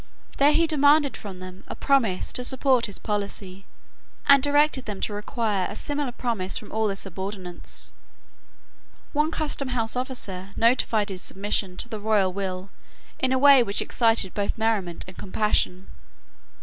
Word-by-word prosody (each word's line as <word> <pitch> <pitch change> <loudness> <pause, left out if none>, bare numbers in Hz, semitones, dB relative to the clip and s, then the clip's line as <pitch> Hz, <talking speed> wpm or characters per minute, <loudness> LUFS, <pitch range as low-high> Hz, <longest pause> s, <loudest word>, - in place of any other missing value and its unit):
There 285 +2 +5
he 330 +2 +3
demanded 290 -2 +4
from 195 -3 -8
them 185 +1 -10
a - - -6
promise 235 -10 +1
to 250 - +1
support 260 -1 +2
his 200 - -7
policy, 200 -2 -4 0.6
and 280 -1 +7
directed 290 -1 +3
them 205 -3 -5
to 210 - -2
require 210 -2 -1
a - - -7
similar 290 +1 -2
promise 230 -7 -2
from 210 - -9
all 220 0 0
their 200 - -2
subordinates. 185 - -5 1.2
One 300 +2 +2
Customhouse 255 -8 -1
officer 200 -7 -4
notified 225 -3 +2
his 185 -2 -4
submission 195 -1 -1
to - - -3
the 220 -3 -6
royal 205 -3 +2
will 190 -1 -4 0.5
in 260 - +1
a 260 - +3
way 280 -1 +7
which 205 -4 -1
excited 225 -5 +1
both 205 +2 -2
merriment 215 -6 -1
and 185 - -10
compassion. 195 -2 0
215 Hz, 150 wpm, -25 LUFS, 190-260 Hz, 1.2 s, and